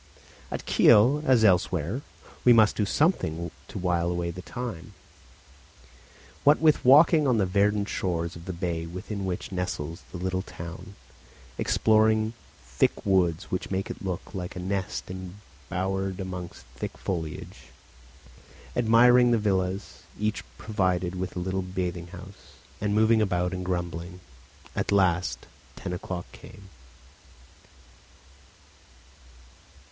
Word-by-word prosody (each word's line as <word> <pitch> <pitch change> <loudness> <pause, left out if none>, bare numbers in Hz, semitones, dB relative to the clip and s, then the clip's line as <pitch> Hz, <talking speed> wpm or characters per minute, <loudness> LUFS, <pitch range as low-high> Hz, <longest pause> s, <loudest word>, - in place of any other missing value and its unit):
At - - -5
Kiel, 130 +8 +5
as 125 -4 +5
elsewhere, 90 - +2 0.4
we 125 - +7
must 110 -2 +5
do 105 - 0
something 85 - 0 0.2
to - - -8
while 90 -1 0
away 85 -1 -2
the 90 +2 -8
time. 110 -6 -6 1.5
What 145 +2 +6
with 155 -2 +4
walking 150 +3 +6
on 125 -3 +3
the 100 - +2
verdant 100 +2 +2
shores 85 -3 -2
of 85 0 -11
the 95 - -4
bay 85 -2 -3
within 95 +3 -5
which 90 0 -4
nestles 90 -3 -4
the 90 - -6
little 95 +1 -2
town, 90 +2 -9 0.6
exploring 110 0 +3
the - - -10 0.3
thick - - 0
woods 90 -2 +1
which 90 - -2
make 95 0 -2
it - - -9
look 95 +1 -5
like 90 -3 -5
a - - -5
nest 95 0 -3
embowered 95 +1 -5
amongst 90 -2 -6
thick - - -6
foliage, 85 -3 -5 1.1
admiring 120 +1 +6
the 120 - +4
villas, 95 -2 -1 0.2
each 105 0 -1
provided 95 -4 0
with 90 0 -4
a - - -2
little 95 +2 -2
bathing 90 -2 -4
house, 95 +2 -13 0.3
and 105 0 0
moving 110 +1 +4
about 90 -3 0
and 90 0 -4
grumbling, 85 -1 -4 0.6
at - - -1
last 90 -3 +1 0.3
ten 90 - -5
o'clock 90 0 -5
came. 100 -1 -14
95 Hz, 130 wpm, -27 LUFS, 90-105 Hz, 1.5 s, we